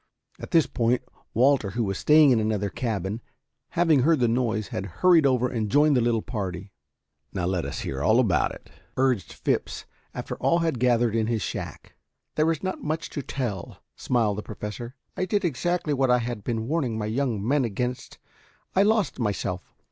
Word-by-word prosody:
At - - -8
this 165 -3 +4
point, 120 0 0 0.3
Walter, 125 -3 +3
who 115 +5 -1
was 95 -2 -2
staying 150 -2 +6
in 120 - +4
another 105 -2 -1
cabin, 110 -2 -3 0.6
having 165 -5 +4
heard 160 +2 +3
the 120 - +3
noise, 115 -3 0
had 95 - -3 0.2
hurried 170 -5 +7
over 125 -2 +2
and 110 -4 -2
joined 145 +5 +4
the 125 - +3
little 115 -2 +1
party. 95 -5 -5 0.6
"Now 90 - -2
let 90 -2 -1
us - - -4
hear 65 0 -4
all 110 - +4
about 105 -9 +2
it," - - -12 0.3
urged 130 -7 +1
Phipps, - - -2 0.3
after - - -6
all 170 - +2
had 165 -7 0
gathered 120 -2 +2
in 110 -1 +1
his 115 -3 -1
shack. - - -6 0.4
"There 155 +1 +2
is 160 - -4
not 185 0 -3
much 155 +2 -3
to 145 - -3
tell," 120 -8 -5
smiled 110 -5 0
the - - -3
Professor. 110 +4 -7 0.2
"I 185 - -1
did 200 +1 0
exactly 170 +2 0
what 135 -2 +1
I 125 - +5
had 120 -3 -4
been 115 -1 -2
warning 135 -7 -1
my 105 - -2
young 110 -2 -1
men 140 +1 +3
against. 125 +3 -3 0.6
I 190 - +5
lost 210 -8 +2
myself. 95 -5 -2
120 Hz, 185 wpm, -25 LUFS, 110-145 Hz, 0.6 s, hurried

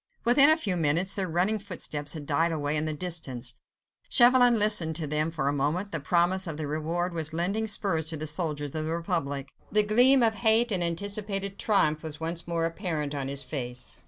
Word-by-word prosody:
Within 275 +5 +8
a 315 - +5
few 200 - -2
minutes 165 +5 +1
their 195 -2 -1
running 185 +6 0
footsteps 160 -7 -3
had 155 -3 -7
died 160 +4 0
away 150 -2 -2
in 150 +1 0
the 155 - -2
distance. 140 -7 -1 0.6
Chauvelin 245 -1 +5
listened 205 -7 +3
to 160 -1 -2
them 150 +2 0
for 155 -4 -3
a 140 - +1
moment; 155 +8 -2
the 165 - -2
promise 175 +5 +1
of 160 -2 -5
the 155 - -4
reward 165 +4 -3
was 160 -1 -1
lending 195 +7 -1
spurs 190 -7 +1
to 160 - -2
the 155 - -3
soldiers 150 -3 -3
of 155 -1 -2
the - - -4
Republic. 165 -5 -3 0.2
The 210 +1 +3
gleam 245 +5 +4
of 225 -1 +2
hate 220 +3 +1
and 185 -3 0
anticipated 200 +2 -3
triumph 155 -8 +1
was 155 -2 -8
once 165 +1 -3
more 165 -1 -1
apparent 165 -4 -4
on 140 -2 -4
his 140 0 -3
face. 125 - -6
170 Hz, 205 wpm, -27 LUFS, 150-200 Hz, 0.6 s, Within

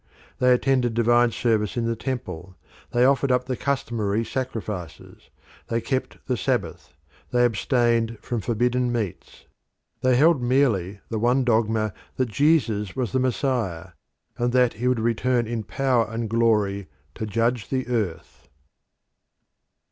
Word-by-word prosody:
They 125 0 +4
attended 125 -2 +2
divine 120 +1 +4
service 110 -1 0
in 120 - 0
the 115 0 0
temple; 95 -8 -5 0.3
they 120 +1 +3
offered 135 0 +3
up 125 0 +2
the 130 0 -2
customary 115 -6 -1
sacrifices; 105 - -6 0.4
they 115 - 0
kept 130 +3 -3
the - - 0
Sabbath; - - -2 0.3
they 125 0 +3
abstained 115 -1 +1
from 115 +1 -3
forbidden 120 +4 0
meats. 110 -7 -5 0.6
They 130 -1 +3
held 150 +1 +4
merely 115 -7 +1
the 110 - -2
one 125 +4 +2
dogma 110 -3 +1 0.2
that 130 -2 0
Jesus 110 - +1
was 125 -4 -2
the 130 - +1
Messiah, 120 - -1 0.5
and 120 0 0
that 125 -2 +4
he 120 +3 -2
would 125 -2 +2
return 120 +2 +1
in 115 0 -3
power 125 0 +1
and 115 0 -3
glory 105 -4 +1 0.3
to 110 - -5
judge 115 0 0
the 130 -1 -1
earth. 105 - -4
120 Hz, 140 wpm, -24 LUFS, 110-125 Hz, 0.6 s, They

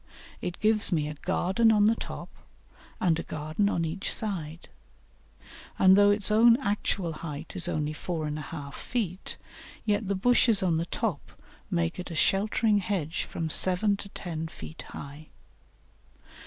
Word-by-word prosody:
It 180 - -5
gives 215 -2 +2
me 155 -4 0
a 150 - -5
garden 190 +7 +1
on 210 -1 +4
the 220 - +5
top - - -7 0.7
and 165 -3 +1
a - - -1
garden 155 +7 -2
on 170 -4 -1
each 165 +5 -3
side, 170 -6 -1 1.1
and 190 0 +6
though 205 0 +6
its 205 0 +2
own 230 +2 +6
actual 200 -7 -1
height 155 0 -8
is - - +2
only 150 0 -2
4 160 0 -4
1/2 150 -1 -6
feet, 200 -7 -4 0.5
yet 210 -1 0
the 200 - 0
bushes 230 0 +3
on 170 -3 +2
the 165 +1 -2
top 210 -8 -3 0.4
make 85 - -1
it 180 - -6
a 165 - -6
sheltering 210 +4 +2
hedge 180 -5 -2
from 160 -2 -4
seven 190 +5 +5
to 200 - -9
ten 165 -4 -5
feet 80 - -10
high. 145 +2 -10
180 Hz, 155 wpm, -27 LUFS, 155-205 Hz, 1.1 s, and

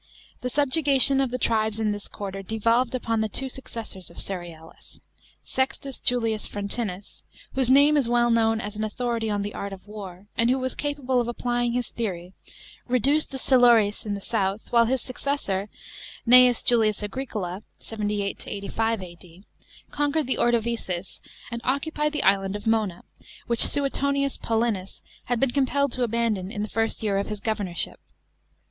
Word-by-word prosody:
The 250 - -2
subjugation 275 -1 +4
of 265 - +1
the 250 - -2
tribes 220 -2 +1
in 215 -1 +1
this 205 -1 -5
quarter 195 -1 -6
devolved 230 +5 +1
upon 230 -3 -1
the 220 - -1
two 270 +6 -1
successors 230 -7 -7
of - - -15
Cerealis. 170 -4 -7 0.4
Sextus 270 0 -2
Julius 225 -3 0
Frontinus, 200 -1 -4 0.3
whose 260 -2 +2
name 285 +3 +6
is 270 -5 +2
well 240 0 +3
known 225 -1 +3
as 210 0 -5
an 215 - -3
authority 230 0 -2
on 205 -1 -1
the 205 - -5
art 200 - -5
of 195 -1 -10
war, 200 -3 -9
and 230 +1 +2
who 260 - +3
was 260 0 -2
capable 275 -4 -1
of 235 - -3
applying 240 0 -1
his 245 -1 -1
theory, 185 -5 -4 0.5
reduced 270 +5 +3
the 270 - -5
Silures, 240 -6 +4
in 205 -2 -2
the 200 - -7
south; 200 -1 -1
while 235 -1 +5
his 255 +2 0
successor, 245 -7 -2 0.6
Gnseus 250 0 +7
Julius 215 -3 +2
Agricola 205 -5 -4 0.2
(78 210 -2 -3
85 220 +1 -2
A.D.), 175 +1 -13 0.5
conquered 290 +1 0
the 260 - 0
Ordovices 230 -6 -1 0.3
and 235 0 -4
occupied 300 +3 0
the 300 - 0
island 195 0 +2
of 205 - -6
Mona, 215 -6 0 0.4
which 235 0 +4
Suetonius 280 0 0
Paulinus 225 -4 -1 0.2
had 245 -1 0
been 270 0 +2
compelled 280 +1 +1
to 255 - -1
abandon, 225 -5 0
in 210 - -3
the 210 - -4
first 225 0 0
year 200 -2 +1
of 200 - -2
his 210 -1 -4
governorship. 205 -5 -1
230 Hz, 165 wpm, -25 LUFS, 205-255 Hz, 0.6 s, Gnseus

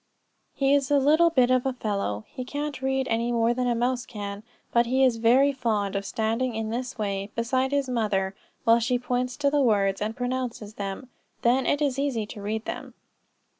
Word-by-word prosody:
He 275 0 +2
is 280 -1 +2
a 290 - +4
little 310 +5 +5
bit 255 -6 +3
of 255 -1 +3
a 265 - -1
fellow. 200 - -3
He 255 - -7
can't 290 +1 -4
read 265 0 0
any 230 +1 0
more 230 0 +2
than 250 0 -1
a 240 - +1
mouse 245 +1 0
can; 205 -3 -6 0.3
but 235 0 +4
he 260 +2 +2
is 250 -3 +3
very 250 +5 +4
fond 215 -7 -1
of 195 0 -2
standing 230 +3 -1
in 220 0 -3
this 250 +2 -4
way, 200 -2 -2
beside 255 +3 0
his 280 -1 +1
mother, 205 -6 0 0.3
while 230 -1 +5
she 245 +2 +1
points 250 0 -2
to 285 -1 +1
the 290 0 +3
words 200 -6 +2
and 220 +3 -2
pronounces 245 -4 -3
them; 200 +5 -5 0.3
then 250 +2 +3
it 290 +1 +2
is 275 -2 0
easy 265 -6 -1
to 205 0 -9
read 215 +2 -3
them. - - -6
245 Hz, 205 wpm, -26 LUFS, 220-265 Hz, 0.3 s, little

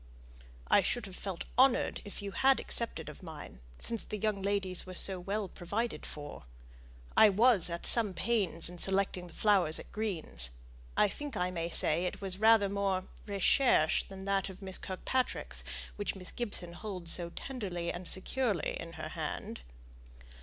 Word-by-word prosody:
"I - - +6
should 240 -3 -1
have 190 -2 -9
felt 190 -3 -5 0.2
honoured 260 -1 +4
if 205 0 -7
you 200 - -4
had 270 +5 +4
accepted 235 -1 -3
of - - -9
mine, 155 - -9 0.2
since 230 -2 -1
the 215 - -5
young 210 -1 -1
ladies 195 -2 0
were 185 - -7
so 190 +1 +3
well 200 +3 -2
provided 205 +7 -3
for. 145 -1 -7 0.7
I 220 - +8
was 210 -3 +4
at 170 0 -5
some 215 -6 +4
pains 195 -6 +1
in 175 0 -6
selecting 190 -1 +2
the 170 - -14
flowers 190 -7 +3
at - - -8
Green's; 165 - 0 0.5
I 210 - +6
think 290 +7 -6
I 180 0 0
may 170 -1 -3
say 165 +1 +4
it 180 - -3
was 195 -1 -3
rather 220 -2 +6
more 195 -1 0 0.2
recherchÄ 200 - +3
than 190 0 -9
that 195 -1 0
of 190 - -10
Miss 190 -1 -5
Kirkpatrick's, 250 +7 -2 0.3
which 205 -1 -2
Miss 185 -1 -8
Gibson 200 -7 -5
holds 180 -4 -2
so 170 -1 -1
tenderly 180 -6 -4
and 175 0 -7
securely 210 - 0
in 165 0 -7
her - - -6
hand." - - -5
195 Hz, 165 wpm, -32 LUFS, 175-215 Hz, 0.7 s, I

